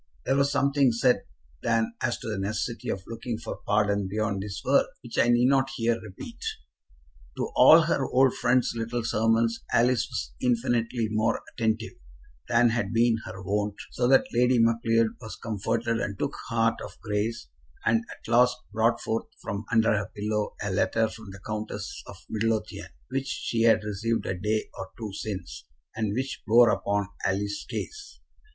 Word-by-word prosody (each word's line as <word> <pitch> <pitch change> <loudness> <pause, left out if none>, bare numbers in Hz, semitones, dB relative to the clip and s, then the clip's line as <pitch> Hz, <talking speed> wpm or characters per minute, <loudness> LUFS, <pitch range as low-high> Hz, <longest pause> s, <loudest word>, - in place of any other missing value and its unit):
There 135 - +2
was 140 0 +2
something 140 -2 +3
said 125 +2 +2 0.4
then 115 -1 +1
as 120 -1 0
to - - -8
the 110 -3 -2
necessity 110 +3 -3
of 95 - -3
looking 115 0 -5
for 115 - -6
pardon 100 -1 +2
beyond 100 -1 -1
this 100 0 -6
world, 140 +2 +4 0.2
which 120 - -4
I - - +5
need 120 0 +4
not 135 0 +3
here 115 -2 0
repeat. 110 - -10 0.9
To - - -2
all - - +9
her - - +1
old 130 0 +4
friend's 130 0 +2
little 115 +1 -2
sermons 115 +1 +1
Alice 120 -1 +3
was 65 -1 -4
infinitely 120 -2 +1
more 110 +1 +1
attentive 110 0 -1 0.6
than 120 0 +5
had 115 +1 -1
been 115 0 +3
her 95 - -8
wont, 105 +1 -1 0.2
so 120 - 0
that 135 +1 +5
Lady 125 +1 +4
Macleod 115 0 +3
was 110 -2 -7
comforted 115 +2 -1
and 100 -1 -3
took - - -2 0.2
heart 115 -1 +1
of 100 - -10
grace, 105 - -2 0.4
and 115 0 +3
at - - -11
last 125 +2 +4 0.2
brought 115 +2 +2
forth 115 +1 -2
from 100 -1 -5
under 115 -1 +4
her 105 0 -1
pillow 105 0 -2
a 105 - -2
letter 110 +3 +1
from 110 -2 -11
the 100 +1 -11
Countess 110 0 -5
of - - -10
Midlothian, 110 0 -2 0.2
which 135 +1 -1
she 115 -3 -2
had 110 -2 +5
received 105 +2 -1
a - - -1
day 105 +4 -1
or 95 - -7
two 110 -4 -6
since, 95 -6 -6 0.3
and 110 -2 -1
which 130 +2 -3
bore 115 0 +7
upon 100 -1 0 0.2
Alice's 100 +1 -2
case. 410 -1 -6
115 Hz, 170 wpm, -27 LUFS, 105-120 Hz, 0.9 s, all